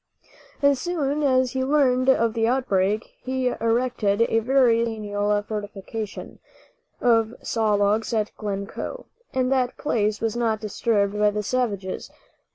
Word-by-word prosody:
As 280 Hz, -2 st, +4 dB
soon 300 Hz, -3 st, -1 dB
as 260 Hz, -3 st, +2 dB
he 260 Hz, -1 st, -1 dB
learned 260 Hz, -2 st, +3 dB
of 230 Hz, -4 st, +3 dB
the 225 Hz, -1 st, +1 dB
outbreak 215 Hz, -4 st, 0 dB
he 260 Hz, -1 st, -1 dB
erected 230 Hz, -3 st, +1 dB
a 225 Hz, -1 st, +2 dB
very 245 Hz, -1 st, +3 dB
substantial 205 Hz, -2 st, -1 dB
fortification 210 Hz, 0 st, -6 dB, 0.6 s
of 230 Hz, -1 st, +2 dB
saw 220 Hz, -2 st, +1 dB
logs 205 Hz, +3 st, +1 dB
at 215 Hz, -2 st, -1 dB
Glencoe, 200 Hz, -, -5 dB, 0.3 s
and 255 Hz, 0 st, 0 dB
that 255 Hz, -2 st, +1 dB
place 215 Hz, -7 st, 0 dB
was 225 Hz, -1 st, -1 dB
not 230 Hz, -2 st, 0 dB
disturbed 210 Hz, -1 st, 0 dB
by 210 Hz, 0 st, +4 dB
the 210 Hz, 0 st, -3 dB
savages. 205 Hz, -5 st, -2 dB
225 Hz, 135 wpm, -24 LUFS, 210-255 Hz, 0.6 s, As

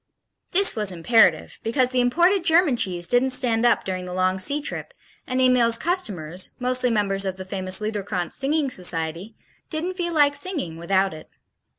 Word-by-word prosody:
This 395 Hz, +2 st, +4 dB
was 210 Hz, -3 st, +1 dB
imperative 185 Hz, +7 st, +2 dB
because 250 Hz, +2 st, 0 dB
the 255 Hz, -, 0 dB
imported 345 Hz, +10 st, +2 dB
German 330 Hz, -5 st, +3 dB
cheese 180 Hz, -6 st, -1 dB
didn't 245 Hz, +6 st, +2 dB
stand 245 Hz, -2 st, +2 dB
up -, -, +2 dB
during 185 Hz, -1 st, -4 dB
the 180 Hz, 0 st, -7 dB
long 185 Hz, +1 st, 0 dB
sea 285 Hz, +10 st, +2 dB
trip 295 Hz, -, -6 dB, 0.3 s
and 255 Hz, 0 st, -2 dB
Emil's 250 Hz, -3 st, +3 dB
customers, 190 Hz, -, -2 dB
mostly 255 Hz, 0 st, 0 dB
members 200 Hz, -3 st, 0 dB
of 190 Hz, -1 st, -3 dB
the 185 Hz, -, -5 dB
famous 185 Hz, 0 st, -1 dB
Liederkranz 205 Hz, -5 st, -4 dB
singing 280 Hz, 0 st, 0 dB
society, 175 Hz, +3 st, -2 dB, 0.3 s
didn't 335 Hz, +3 st, -3 dB
feel 350 Hz, -2 st, -3 dB
like 290 Hz, -1 st, +4 dB
singing 285 Hz, -, -3 dB
without 190 Hz, +2 st, 0 dB
it. 155 Hz, -, -12 dB
230 Hz, 170 wpm, -23 LUFS, 185-280 Hz, 0.3 s, This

